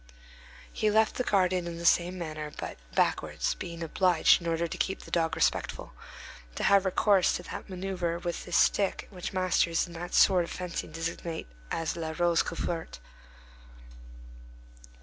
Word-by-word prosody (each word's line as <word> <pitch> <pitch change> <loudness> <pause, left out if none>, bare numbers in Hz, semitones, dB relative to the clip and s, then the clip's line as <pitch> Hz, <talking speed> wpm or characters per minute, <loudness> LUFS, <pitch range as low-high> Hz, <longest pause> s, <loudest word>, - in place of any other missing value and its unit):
He 215 - +1
left 220 +1 +2
the 250 - 0
garden 185 -4 +1
in 170 -1 -5
the 170 - -6
same 175 +2 +3
manner, 155 -3 -5
but - - -6 0.2
backwards, - - +1
being 170 -2 -7
obliged, 175 +1 +4
in 170 - -5
order 165 0 0
to - - -6
keep 190 - -1
the - - -13
dog 165 -1 +1
respectful, 160 - -1 0.6
to - - -3
have 200 -1 +5
recourse 190 0 +3
to - - -5
that - - -7
manœuvre 180 -2 -3
with 175 -1 -3
his - - -3
stick 200 -2 +2
which 180 -3 -6
masters 185 -3 +1
in 175 - -12
that 175 +1 -5
sort 185 -3 +5
of 170 - -7
fencing 180 -3 -5
designate 165 +1 -4 0.2
as 165 0 -2
la 160 -2 -4
rose 175 -1 +3
couverte. 165 0 -4
175 Hz, 160 wpm, -29 LUFS, 165-185 Hz, 0.6 s, have